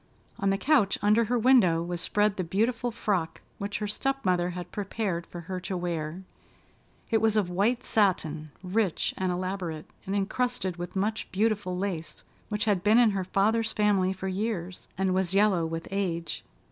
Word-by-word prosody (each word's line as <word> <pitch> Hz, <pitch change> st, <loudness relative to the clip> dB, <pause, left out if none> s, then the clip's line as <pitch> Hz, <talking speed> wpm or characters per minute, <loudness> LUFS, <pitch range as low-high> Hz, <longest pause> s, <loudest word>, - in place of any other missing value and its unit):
On 195 Hz, -, +1 dB
the 195 Hz, -, +2 dB
couch, 250 Hz, -5 st, +3 dB
under 215 Hz, +3 st, +4 dB
her 245 Hz, +3 st, +1 dB
window 220 Hz, -9 st, +5 dB
was 175 Hz, 0 st, -3 dB
spread 210 Hz, +1 st, +2 dB
the 185 Hz, -, -2 dB
beautiful 225 Hz, +8 st, 0 dB
frock 190 Hz, -7 st, -2 dB, 0.2 s
which 200 Hz, +1 st, -3 dB
her 210 Hz, -, -3 dB
step 270 Hz, +6 st, -2 dB
mother 180 Hz, -1 st, +2 dB
had 180 Hz, 0 st, -7 dB
prepared 195 Hz, -4 st, -3 dB
for 175 Hz, -, -8 dB
her 185 Hz, +2 st, -5 dB
to 185 Hz, +1 st, -3 dB
wear. 170 Hz, 0 st, -3 dB, 0.9 s
It 225 Hz, -, +4 dB
was 220 Hz, -1 st, +3 dB
of 190 Hz, -4 st, +1 dB
white 215 Hz, +7 st, +1 dB
satin, 160 Hz, -7 st, +1 dB
rich 190 Hz, -1 st, 0 dB
and 185 Hz, -1 st, -1 dB
elaborate, 180 Hz, -3 st, -3 dB, 0.2 s
and 195 Hz, -, -1 dB
encrusted 200 Hz, -2 st, -1 dB
with 175 Hz, +2 st, -6 dB
much 210 Hz, +3 st, -1 dB
beautiful 205 Hz, -3 st, 0 dB
lace, 170 Hz, -5 st, -4 dB, 0.3 s
which 210 Hz, -1 st, -1 dB
had 200 Hz, -4 st, +1 dB
been 215 Hz, +2 st, +5 dB
in 240 Hz, -3 st, +6 dB
her 195 Hz, -2 st, -1 dB
father's 220 Hz, +4 st, +1 dB
family 200 Hz, -3 st, +2 dB
for 190 Hz, 0 st, -5 dB
years, 190 Hz, -2 st, -3 dB
and 190 Hz, -1 st, +1 dB
was 190 Hz, 0 st, +1 dB
yellow 195 Hz, -5 st, +3 dB
with 165 Hz, 0 st, -5 dB
age. 175 Hz, -4 st, -2 dB
195 Hz, 175 wpm, -28 LUFS, 180-215 Hz, 0.9 s, in